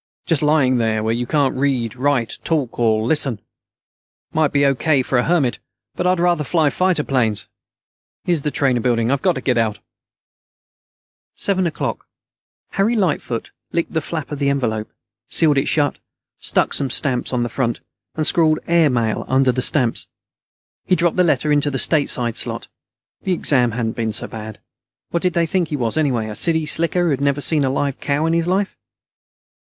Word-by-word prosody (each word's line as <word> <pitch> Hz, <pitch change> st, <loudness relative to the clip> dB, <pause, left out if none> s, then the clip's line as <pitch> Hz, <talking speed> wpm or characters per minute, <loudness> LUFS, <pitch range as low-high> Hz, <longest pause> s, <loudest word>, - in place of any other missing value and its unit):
Just 165 Hz, -5 st, +1 dB
lying 150 Hz, -4 st, +3 dB
there, 110 Hz, -2 st, 0 dB
where 110 Hz, +1 st, 0 dB
you 120 Hz, +1 st, -3 dB
can't 140 Hz, -2 st, +1 dB
read, 130 Hz, -4 st, -1 dB
write, 130 Hz, -3 st, -1 dB
talk, 145 Hz, -9 st, -2 dB
or 110 Hz, -2 st, +2 dB
listen. 135 Hz, -2 st, +1 dB
It 100 Hz, -, -23 dB, 0.9 s
might 155 Hz, -2 st, +2 dB
be 140 Hz, 0 st, +2 dB
O.K. 140 Hz, 0 st, +2 dB
for 125 Hz, 0 st, 0 dB
a -, -, +2 dB
hermit, 155 Hz, -8 st, +1 dB, 0.3 s
but 180 Hz, -, -2 dB
I'd 185 Hz, -1 st, +2 dB
rather 175 Hz, -3 st, +2 dB
fly 155 Hz, 0 st, +1 dB
fighter 185 Hz, -4 st, +1 dB
planes. 115 Hz, -7 st, -1 dB, 0.8 s
Here's 170 Hz, -4 st, 0 dB
the 150 Hz, -, -1 dB
trainer 135 Hz, -4 st, +1 dB
building. 115 Hz, 0 st, +1 dB
I've 140 Hz, -1 st, 0 dB
got 185 Hz, -, +2 dB
to 130 Hz, -, -4 dB
get 125 Hz, -2 st, +1 dB
out." 110 Hz, -2 st, 0 dB, 1.6 s
Seven 190 Hz, -3 st, 0 dB
o'clock. 155 Hz, -, -4 dB, 0.6 s
Harry 205 Hz, +5 st, +1 dB
Lightfoot 160 Hz, -, -2 dB, 0.2 s
licked 170 Hz, -, -2 dB
the 160 Hz, -, 0 dB
flap 155 Hz, -1 st, -5 dB
on 145 Hz, -, -5 dB
the 140 Hz, -1 st, +1 dB
envelope, 110 Hz, -6 st, -2 dB, 0.4 s
sealed 150 Hz, -4 st, +3 dB
it 135 Hz, -, -2 dB
shut, 145 Hz, -2 st, 0 dB, 0.4 s
stuck -, -, 0 dB
some 140 Hz, -2 st, +1 dB
stamps 125 Hz, -1 st, +3 dB
on 125 Hz, -2 st, 0 dB
the -, -, -1 dB
front, 120 Hz, 0 st, -2 dB, 0.4 s
and 155 Hz, -, -1 dB
scrawled 155 Hz, -1 st, +3 dB
"AIR 170 Hz, -3 st, +4 dB
MAIL" 115 Hz, -4 st, -1 dB
under 130 Hz, 0 st, +3 dB
the 130 Hz, +1 st, -2 dB
stamps. 125 Hz, -4 st, +2 dB, 0.8 s
He 185 Hz, -, +2 dB
dropped 175 Hz, -1 st, 0 dB
the 180 Hz, -, +5 dB
letter 150 Hz, -2 st, +1 dB
into 145 Hz, 0 st, +2 dB
the 135 Hz, -, -3 dB
"STATESIDE" 130 Hz, -6 st, +2 dB
slot. -, -, -3 dB, 0.5 s
The 185 Hz, -, -1 dB
exam 125 Hz, -8 st, +3 dB
hadn't 115 Hz, -1 st, -3 dB
been 110 Hz, -2 st, -2 dB
so -, -, -2 dB
bad. 110 Hz, -1 st, -8 dB, 0.5 s
What 170 Hz, -, -1 dB
did 180 Hz, -1 st, 0 dB
they 170 Hz, -1 st, +1 dB
think 175 Hz, +1 st, 0 dB
he 150 Hz, -, -3 dB
was, 120 Hz, -5 st, -1 dB
anyway? 130 Hz, -8 st, 0 dB
A 105 Hz, -, -6 dB
city 160 Hz, +5 st, +2 dB
slicker 170 Hz, +4 st, +1 dB
who 165 Hz, -, +1 dB
had 135 Hz, -1 st, -1 dB
never 140 Hz, 0 st, +1 dB
seen 145 Hz, +2 st, +2 dB
a 135 Hz, -, +1 dB
live 140 Hz, +1 st, -2 dB
cow 145 Hz, +2 st, -1 dB
in 165 Hz, -, +1 dB
his 170 Hz, 0 st, 0 dB
life? 190 Hz, +2 st, 0 dB
140 Hz, 190 wpm, -19 LUFS, 120-160 Hz, 1.6 s, the